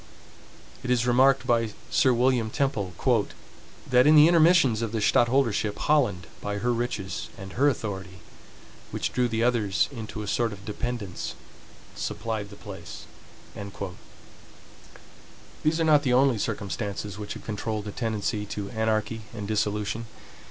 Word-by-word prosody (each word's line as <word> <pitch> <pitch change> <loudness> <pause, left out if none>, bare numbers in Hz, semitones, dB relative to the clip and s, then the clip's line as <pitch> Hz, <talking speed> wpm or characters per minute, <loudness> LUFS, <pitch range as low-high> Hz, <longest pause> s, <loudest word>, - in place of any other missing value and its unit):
It 125 - -5
is 125 -1 +2
remarked 130 +2 +4
by 115 -3 +1 0.2
Sir 130 - +4
William 120 -2 +2
Temple, 110 -7 -1 1.0
"that 125 +1 +5
in 155 - +7
the 150 +1 +9
intermissions 165 -8 +5
of 115 -1 -3
the - - 0
stadtholdership, 115 -2 +2
Holland, 105 - +1 0.2
by 105 0 -3
her 120 +4 +1
riches 115 -6 -3
and 95 0 -9
her 140 +4 +4
authority, 95 -7 -5 0.7
which - - -3
drew 125 0 +2
the 115 -1 -1
others 115 -6 +2
into 110 -4 -6
a - - -7
sort 115 +2 0
of 100 0 -12
dependence, 110 -3 -4 0.6
supplied 110 -3 -3
the 100 - -11
place." 95 -4 -9 2.6
These 155 +2 +2
are - - +3
not 155 -2 +5
the 130 -3 +1
only 130 -3 +4
circumstances 100 -1 -3
which 105 - -5
have - - -10
controlled 110 0 -3
the 105 - -4
tendency 105 -2 -2
to 100 -1 -5
anarchy 110 0 -1
and 105 -2 -5
dissolution. 105 +1 -1
110 Hz, 140 wpm, -26 LUFS, 105-125 Hz, 2.6 s, the